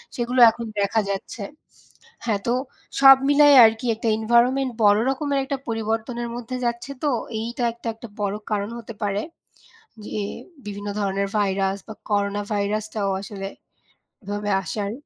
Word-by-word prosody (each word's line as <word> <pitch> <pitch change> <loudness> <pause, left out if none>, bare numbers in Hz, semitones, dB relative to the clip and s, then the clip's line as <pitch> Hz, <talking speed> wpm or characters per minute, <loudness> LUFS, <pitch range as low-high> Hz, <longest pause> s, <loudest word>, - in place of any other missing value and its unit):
সেগুলো 245 +1 -1
এখন 235 +1 -7
দেখা 200 +2 +2
যাচ্ছে। 200 +2 -4 0.8
হ্যাঁ, 215 -4 0
তো 235 - +2 0.5
সব 270 -1 +10
মিলায় 290 0 +7
আরকি 220 +2 -1
একটা 225 +1 -3
এনভায়রনমেন্ট 245 +4 +2
বড়ো 205 +1 +6
রকমের 280 0 -1
একটা 275 0 -3
পরিবর্তনের 225 +2 -2
মধ্যে 245 +1 -5
যাচ্ছে 235 +2 -3
তো 295 - +3 0.3
এইটা 235 +2 -3
একটা 235 0 -7
একটা 230 +1 -11
বড়ো 205 0 -1
কারণ 205 0 -1
হতে 230 -1 -9
পারে, 205 0 0 0.8
যে - - -8 0.6
বিভিন্ন 205 0 -6
ধরনের 200 0 0
ভাইরাস 195 -1 0
বা 220 - -7 0.2
করোনা 205 0 0
ভাইরাসটাও 210 0 -1
আসলে 195 -1 -6 0.8
এভাবে 205 +1 -3
আসার। 200 +3 -3
220 Hz, 140 wpm, -23 LUFS, 205-240 Hz, 0.8 s, সব